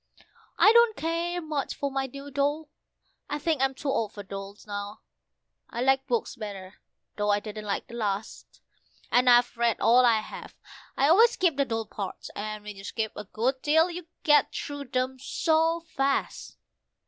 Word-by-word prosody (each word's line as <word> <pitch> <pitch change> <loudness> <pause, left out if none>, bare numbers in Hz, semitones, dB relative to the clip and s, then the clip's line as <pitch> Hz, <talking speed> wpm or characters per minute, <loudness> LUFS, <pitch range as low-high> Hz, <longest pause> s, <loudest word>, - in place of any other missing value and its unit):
I 430 - +7
don't 470 -2 +5
care 335 +2 -1
much 300 -3 -3
for 280 -1 -3
my 270 0 -1
new 275 +2 -10
doll 290 +3 -1 0.6
I 295 - -1
think 305 -2 0
I'm 270 0 +1
too 285 - -4
old 225 -6 -1
for 205 - -8
dolls 195 +1 -8
now; 205 0 -6 0.7
I 235 - -4
like 270 +1 +2
books 240 -1 -1
better, 200 -4 -8 0.4
though 205 0 0
I 205 0 +3
didn't 215 0 -8
like 200 -1 -2
the - - -14
last, 210 -3 -4 0.5
And 250 +1 +4
I've 245 0 +5
read 235 -1 +1
all 245 +2 +5
I 230 -3 +4
have: - - -10 0.4
I 275 - +4
always 450 +9 +6
skip 360 - +2
the 280 0 +1
dull 225 -3 -2
parts, 205 -2 -7
and 215 0 -5
when 210 0 -8
you 195 - -10
skip 220 +1 -3
a 210 - -7
good 250 +6 -1
deal 320 +4 +3
you 345 -1 -7 0.2
get 295 -1 +4
through 285 -1 -5
them 255 +1 -2
so 325 +4 +1
fast. 275 -4 -2
260 Hz, 180 wpm, -27 LUFS, 215-295 Hz, 0.7 s, I